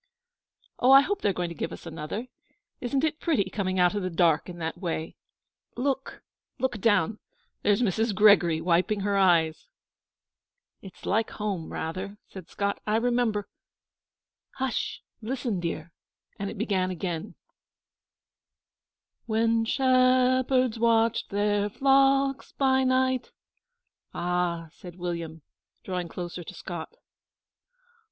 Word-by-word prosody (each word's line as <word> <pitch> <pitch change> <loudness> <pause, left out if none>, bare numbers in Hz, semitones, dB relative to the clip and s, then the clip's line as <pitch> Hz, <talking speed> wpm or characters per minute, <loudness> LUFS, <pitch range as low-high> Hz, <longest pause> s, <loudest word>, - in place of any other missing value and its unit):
'Oh, 255 - +5
I 270 0 +10
hope 400 +7 -2
they 205 - +2
are - - 0
going 175 -1 -2
to - - -6
give - - -4
us - - -9
another! 165 +7 -5 0.5
Isn't 265 +3 -1
it 310 -1 0
pretty, 205 - 0
coming 190 -2 -2
out 180 0 +4
of 205 - -2
the 185 - -2
dark 165 -1 +2
in 175 - -8
that 165 -1 -4
way? 165 -3 -3 0.6
Look 270 +1 -2 0.3
look 250 -3 -1
down. 205 -1 +2 0.4
There's 205 +3 +2
Mrs. 220 +1 0
Gregory 185 -6 +5
wiping 180 +4 +1
her 200 0 0
eyes!' 170 - +3 1.1
'It's 190 -3 -12
like 220 +3 +1
home, 200 -6 -4
rather,' 185 +5 -5
said 190 -3 -11
Scott. 200 0 -2
'I 210 - +2
remember 230 -3 +1 1.1
'H'sh! 260 -3 -2 0.2
Listen! 240 -3 -2
dear.'And 170 +4 -7
it 225 - -8
began 195 -4 0
again: 180 +1 -4 1.9
When 225 0 +2
shepherds 255 -1 +3
watched 230 0 +2
their 205 0 +1
flocks 270 +2 +2
by 265 -1 +2
night 260 0 +1 0.8
'A 175 -1 0
h - - -11
h!' 155 - -21
said 175 -1 -10
William, 170 -3 -5 0.4
drawing 180 -2 -3
closer 175 +1 -6
to 185 - -10
Scott. 170 -2 -7
205 Hz, 130 wpm, -27 LUFS, 175-245 Hz, 1.9 s, I